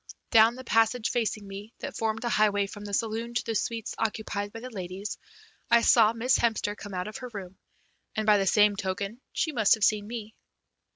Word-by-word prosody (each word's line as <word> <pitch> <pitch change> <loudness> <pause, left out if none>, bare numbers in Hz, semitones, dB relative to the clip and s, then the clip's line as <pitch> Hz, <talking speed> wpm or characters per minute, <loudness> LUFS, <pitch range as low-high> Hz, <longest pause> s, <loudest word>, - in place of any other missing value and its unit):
Down 225 0 +6
the 260 - -9
passage 225 0 +2
facing 220 -3 -1
me, 200 +3 -9
that - - -6
formed 225 0 -2
a - - 0
highway 205 -2 +3
from 205 +1 -9
the 205 - -6
saloon 225 +3 -2
to - - +1
the 230 - -2
suites 225 0 -2
occupied 210 -2 -2
by 225 - -8
the 255 +2 -8
ladies, 190 0 -6 0.5
I 235 0 +6
saw 225 -2 +6
Miss 235 +3 +2
Hemster 220 -3 0
come 205 -2 -8
out 180 +1 -3
of 215 - -6
her 255 -2 -7
room, 190 -2 -8 0.6
and, 215 - -1
by 210 -1 +5
the 195 - 0
same 210 0 +4
token, 200 +4 -4
she 315 - -1
must 225 -7 +4
have 220 - -5
seen 210 0 +2
me. 220 -2 -6
215 Hz, 210 wpm, -28 LUFS, 205-230 Hz, 0.6 s, Down